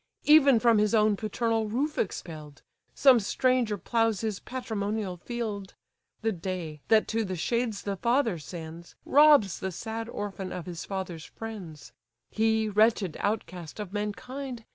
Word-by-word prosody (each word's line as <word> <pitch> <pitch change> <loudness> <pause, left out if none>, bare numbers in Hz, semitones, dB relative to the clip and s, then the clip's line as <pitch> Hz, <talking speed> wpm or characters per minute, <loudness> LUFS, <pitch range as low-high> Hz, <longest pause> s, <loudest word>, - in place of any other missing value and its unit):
Even 285 -5 +6
from 230 -2 +4
his 210 +1 +2
own 215 -1 +4
paternal 225 +1 -1
roof 285 +7 -1
expell'd, 155 -7 -5 0.3
Some 265 -4 +6
stranger 240 0 +1
ploughs 225 +1 0
his 215 -3 -2
patrimonial 215 -6 -3
field. 210 -2 -5 0.5
The 225 - +2
day, 175 -5 -5
that 220 -1 +4
to 225 0 0
the 185 -3 -3
shades 235 +4 -1
the 200 -1 -3
father 235 - +1
sends, 165 +2 -9
Robs 290 - +5
the 190 -2 -3
sad 225 +5 -5
orphan 200 -4 -5
of 180 - -5
his 175 -2 -6
father's 185 -5 -5
friends: 185 -11 -9 0.4
He, 220 0 +2
wretched 210 -4 +2
outcast 185 -5 -3
of 205 -2 -6
mankind! 230 +4 -5
210 Hz, 140 wpm, -28 LUFS, 185-230 Hz, 0.5 s, Even